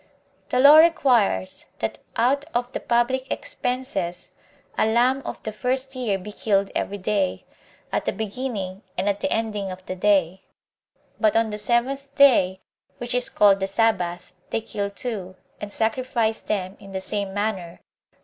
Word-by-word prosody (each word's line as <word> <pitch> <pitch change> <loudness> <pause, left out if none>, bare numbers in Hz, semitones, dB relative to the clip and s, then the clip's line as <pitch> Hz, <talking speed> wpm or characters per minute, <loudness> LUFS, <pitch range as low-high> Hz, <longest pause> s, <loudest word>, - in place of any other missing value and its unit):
1. 255 +1 +2
The - - +10
law 300 +2 +10
requires, 250 - +3
that - - -3 0.2
out 265 +5 +2
of 245 +1 -1
the - - -3
public 255 +2 0
expenses 245 -9 -3 0.4
a - - +2
lamb 245 +4 +3
of - - -6
the 215 - -3
first 260 +4 -2
year 235 -6 0
be 200 +3 -9
killed 200 -2 0
every 205 - -2
day, 195 -1 -1 0.5
at - - -1
the - - +1
beginning 210 -4 -4 0.2
and 185 +3 -1
at 200 0 +1
the 285 - -2
ending 210 -4 -1
of 185 0 -9
the 185 - -4
day; 190 -2 +2 0.8
but 215 -2 +3
on 225 -1 +2
the 210 - -3
seventh 265 +5 -1
day, 190 -10 +5 0.4
which 245 +3 -5
is 250 0 +1
called 200 -2 +4
the 195 - -1
Sabbath, 180 -4 0 0.2
they 225 - -1
kill 205 -2 -3
two, 200 -4 -5 0.2
and 210 - -6
sacrifice 225 0 0
them 190 -2 -3
in 195 0 -12
the 190 - -2
same 200 0 -2
manner. 195 -4 -3
215 Hz, 165 wpm, -24 LUFS, 195-250 Hz, 0.8 s, The